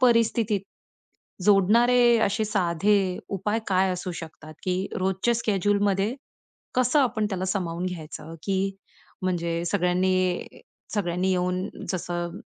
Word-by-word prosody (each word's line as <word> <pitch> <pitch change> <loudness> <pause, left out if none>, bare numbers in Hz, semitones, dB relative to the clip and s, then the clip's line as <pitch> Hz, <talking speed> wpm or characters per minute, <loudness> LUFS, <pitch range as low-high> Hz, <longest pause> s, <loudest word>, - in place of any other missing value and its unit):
परिस्थितीत 230 -4 +3 0.8
जोडणारे 235 +5 +5
असे 205 +2 0
साधे 200 0 +2 0.4
उपाय 210 +4 0
काय 190 -1 +3
असू 180 0 -4
शकतात, 155 -1 -10
की 185 +1 -1
रोजच्या 190 +5 +1
शेड्यूलमध्ये 205 +1 +1 0.6
कसं 255 +4 +3
आपण 220 -5 +1
त्याला 185 -1 -2
सामावून 180 -2 -2
घ्यायचं, 165 -2 -6
की 195 0 0 0.5
म्हणजे 170 -2 -1
सगळ्यांनी 180 +1 +1 0.5
सगळ्यांनी 180 -1 0
येऊन 180 +1 0 0.2
जसं 175 -1 -3
190 Hz, 105 wpm, -26 LUFS, 180-210 Hz, 0.8 s, जोडणारे